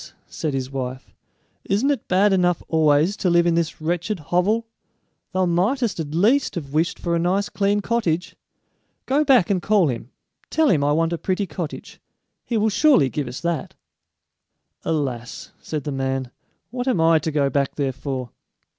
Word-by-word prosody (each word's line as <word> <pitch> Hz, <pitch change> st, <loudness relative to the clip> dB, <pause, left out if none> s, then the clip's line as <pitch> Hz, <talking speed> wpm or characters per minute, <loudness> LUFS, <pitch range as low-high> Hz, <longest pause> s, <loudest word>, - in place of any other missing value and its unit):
said 155 Hz, -, -4 dB
his 130 Hz, 0 st, -3 dB
wife; 130 Hz, -1 st, -5 dB, 0.5 s
"isn't 215 Hz, +9 st, +1 dB
it 275 Hz, -6 st, -3 dB
bad 195 Hz, +2 st, +3 dB
enough 180 Hz, -2 st, +2 dB
always 160 Hz, +3 st, +3 dB
to 185 Hz, -, 0 dB
live 170 Hz, 0 st, +4 dB
in 170 Hz, -, +3 dB
this 165 Hz, -1 st, -1 dB
wretched 175 Hz, +5 st, -2 dB
hovel? 180 Hz, +9 st, +1 dB, 0.7 s
Thou 185 Hz, 0 st, +1 dB
mightest 195 Hz, +6 st, 0 dB
at 155 Hz, -1 st, -4 dB
least 225 Hz, +9 st, +2 dB
have 145 Hz, -5 st, -6 dB
wished 160 Hz, +3 st, +1 dB
for 170 Hz, -1 st, -1 dB
a -, -, +1 dB
nice 190 Hz, +4 st, 0 dB
clean 205 Hz, 0 st, +1 dB
cottage. 190 Hz, -7 st, -1 dB, 0.7 s
Go 285 Hz, +3 st, +2 dB
back 255 Hz, -, +4 dB
and 185 Hz, -3 st, +1 dB
call 205 Hz, -7 st, +3 dB
him; 120 Hz, -1 st, -5 dB, 0.4 s
tell 315 Hz, -1 st, +2 dB
him 145 Hz, -4 st, +2 dB
I 145 Hz, -, +2 dB
want 165 Hz, +2 st, +1 dB
a 170 Hz, -, -3 dB
pretty 190 Hz, +2 st, -1 dB
cottage; 165 Hz, -2 st, -7 dB, 0.4 s
he 235 Hz, -, -2 dB
will 220 Hz, +1 st, +2 dB
surely 235 Hz, -, +4 dB
give 145 Hz, -4 st, -3 dB
us 125 Hz, +1 st, -7 dB
that!" 170 Hz, +2 st, -3 dB, 1.1 s
"Alas," 130 Hz, -6 st, -3 dB
said 150 Hz, -3 st, -5 dB
the 145 Hz, -, -4 dB
man, 135 Hz, -2 st, -2 dB, 0.4 s
"what 245 Hz, +1 st, -4 dB
am 250 Hz, -10 st, +2 dB
I 165 Hz, 0 st, +5 dB
to 155 Hz, -, -3 dB
go 140 Hz, -2 st, +1 dB
back 140 Hz, -1 st, 0 dB
there 135 Hz, -3 st, -1 dB
for?" 130 Hz, -2 st, -5 dB
170 Hz, 175 wpm, -22 LUFS, 145-205 Hz, 1.1 s, I